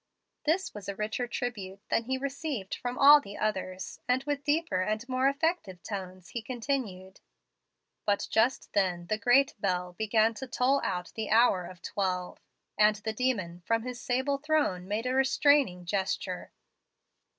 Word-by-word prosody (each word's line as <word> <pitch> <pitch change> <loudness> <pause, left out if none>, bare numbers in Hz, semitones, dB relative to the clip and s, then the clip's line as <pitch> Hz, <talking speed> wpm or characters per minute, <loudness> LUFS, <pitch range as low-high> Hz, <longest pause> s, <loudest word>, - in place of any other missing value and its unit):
This 345 +5 +1
was 205 -2 -7
a 200 - -3
richer 215 +4 -2
tribute 205 -6 -4
than 230 - +1
he 260 +2 -1
received 275 -6 -4
from 245 0 -4
all 290 +1 +9
the 205 -6 -9
others, 190 -3 -3
and 250 +1 +2
with 290 0 -2
deeper 295 - +1
and 215 +6 -2
more 260 +1 +2
effective 280 - -1
tones 185 -3 -6
he 235 - -4
continued: 225 -6 -4 0.9
"But 205 -1 +1
just 235 +4 +1
then 180 -4 +1
the 215 +4 -1
great 250 +6 +4
bell 180 -2 -1
began 220 +3 +2
to 265 - -4
toll 255 +3 +2
out 180 -2 -2
the 220 -2 -4
hour 220 -5 +4
of 180 -2 -13
twelve, 180 -2 -2 0.4
and 210 0 +6
the 220 +1 -4
demon, 205 -8 -1
from 225 0 +1
his 250 0 -6
sable 265 +3 0
throne, 290 -12 0
made 215 +4 -2
a 255 - 0
restraining 270 -7 +3
gesture. 190 +2 -2
220 Hz, 160 wpm, -29 LUFS, 190-265 Hz, 0.9 s, all